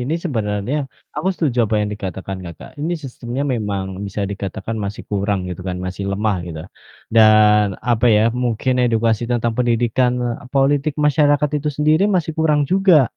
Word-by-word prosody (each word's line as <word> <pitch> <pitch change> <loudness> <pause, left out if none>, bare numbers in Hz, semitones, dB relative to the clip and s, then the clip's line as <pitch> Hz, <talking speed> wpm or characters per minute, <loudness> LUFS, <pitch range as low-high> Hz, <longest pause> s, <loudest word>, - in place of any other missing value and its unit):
ini 135 +6 -1
sebenarnya 110 - -1 0.4
aku 190 - 0
setuju 140 -8 -1
apa 110 - 0
yang 105 - -1
dikatakan 95 -1 -5
Kakak, 85 -1 -10
ini 165 +4 -1
sistemnya 125 0 -5
memang 100 -4 -2 0.2
bisa 100 +1 -5
dikatakan 100 +2 -5
masih 100 +2 -5
kurang, 100 0 0
gitu 90 0 -6
kan, 90 - -3
masih 95 +2 -5
lemah, 105 0 0
gitu. 80 -2 -6 0.5
Dan, 110 -1 +6 0.3
apa 120 +1 +3
ya, 105 - +4
mungkin 125 +1 0
edukasi 115 -1 +1
tentang 120 -1 0
pendidikan 120 +1 +2 0.4
politik 140 +2 +2
masyarakat 145 -1 +3
itu 150 - -2
sendiri 155 +4 +3
masih 165 -3 0
kurang 155 -2 +3
juga. 185 -7 +5
115 Hz, 155 wpm, -19 LUFS, 105-145 Hz, 0.5 s, Dan